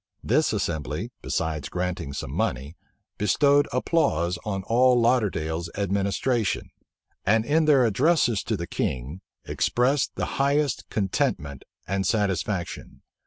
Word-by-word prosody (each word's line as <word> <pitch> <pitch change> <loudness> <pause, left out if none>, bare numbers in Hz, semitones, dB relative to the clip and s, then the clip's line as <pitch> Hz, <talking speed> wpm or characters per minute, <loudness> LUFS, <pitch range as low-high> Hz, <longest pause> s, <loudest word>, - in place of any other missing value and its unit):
This - - +2
assembly, 80 - -3
besides 80 -2 -2
granting 90 -5 -3
some 70 - -5
money, 70 +6 -2 0.4
bestowed 140 +8 +3
applause 90 - +1
on 95 -3 -3
all 125 +4 +4
Lauderdale's 90 -9 0
administration, 100 +3 0 0.5
and 110 +2 +2
in 155 +5 +2
their 140 -5 +5
addresses 120 - +2
to - - -1
the - - -4
king, 65 +9 -3 0.2
expressed 130 +3 +1
the - - -1 0.2
highest 140 +1 +1
contentment 75 -8 -1 0.2
and 95 0 -1
satisfaction. 100 -3 -2
100 Hz, 115 wpm, -25 LUFS, 85-125 Hz, 0.5 s, their